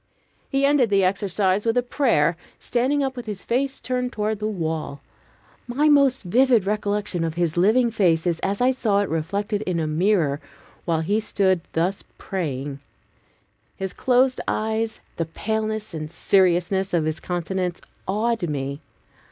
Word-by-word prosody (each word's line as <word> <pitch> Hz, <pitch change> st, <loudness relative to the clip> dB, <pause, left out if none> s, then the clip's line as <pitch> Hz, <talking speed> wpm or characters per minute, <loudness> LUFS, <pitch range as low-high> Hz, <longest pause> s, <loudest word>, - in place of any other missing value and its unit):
He 275 Hz, 0 st, +2 dB
ended 280 Hz, -5 st, +3 dB
the 200 Hz, -1 st, +3 dB
exercise 195 Hz, +1 st, +1 dB
with 230 Hz, +1 st, +1 dB
a 245 Hz, -, +3 dB
prayer, 230 Hz, -, +2 dB, 0.2 s
standing 265 Hz, +4 st, 0 dB
up 265 Hz, -1 st, -2 dB
with 245 Hz, -2 st, -7 dB
his 205 Hz, -2 st, -5 dB
face 270 Hz, +3 st, 0 dB
turned 250 Hz, +1 st, -2 dB
toward 215 Hz, 0 st, -2 dB
the 215 Hz, -, -1 dB
wall. 160 Hz, -7 st, -3 dB, 0.7 s
My 285 Hz, +5 st, +2 dB
most 275 Hz, -4 st, +4 dB
vivid 235 Hz, +2 st, +3 dB
recollection 205 Hz, -3 st, -1 dB
of 165 Hz, -1 st, -2 dB
his 170 Hz, -2 st, 0 dB
living 225 Hz, +7 st, +3 dB
face 175 Hz, -7 st, +2 dB
is 170 Hz, -2 st, 0 dB
as 200 Hz, +3 st, -2 dB
I 255 Hz, +1 st, +4 dB
saw 215 Hz, -6 st, +1 dB
it 205 Hz, -, -2 dB
reflected 200 Hz, +6 st, -2 dB
in 180 Hz, -5 st, -1 dB
a 160 Hz, -, 0 dB
mirror 155 Hz, -2 st, +1 dB, 0.4 s
while 165 Hz, -2 st, +1 dB
he 205 Hz, +7 st, +1 dB
stood 190 Hz, -4 st, +1 dB
thus 180 Hz, +4 st, 0 dB
praying. 140 Hz, -6 st, -4 dB, 1.0 s
His 190 Hz, -1 st, -4 dB
closed 255 Hz, 0 st, +2 dB
eyes, 220 Hz, +1 st, -1 dB, 0.2 s
the 165 Hz, -, 0 dB
paleness 220 Hz, +4 st, -3 dB
and 155 Hz, -1 st, -5 dB
seriousness 185 Hz, +1 st, +2 dB
of 160 Hz, -2 st, +1 dB
his 155 Hz, +1 st, -2 dB
countenance, 180 Hz, 0 st, -3 dB, 0.3 s
awed 215 Hz, -1 st, 0 dB
me. 140 Hz, 0 st, -3 dB
200 Hz, 155 wpm, -23 LUFS, 170-230 Hz, 1.0 s, most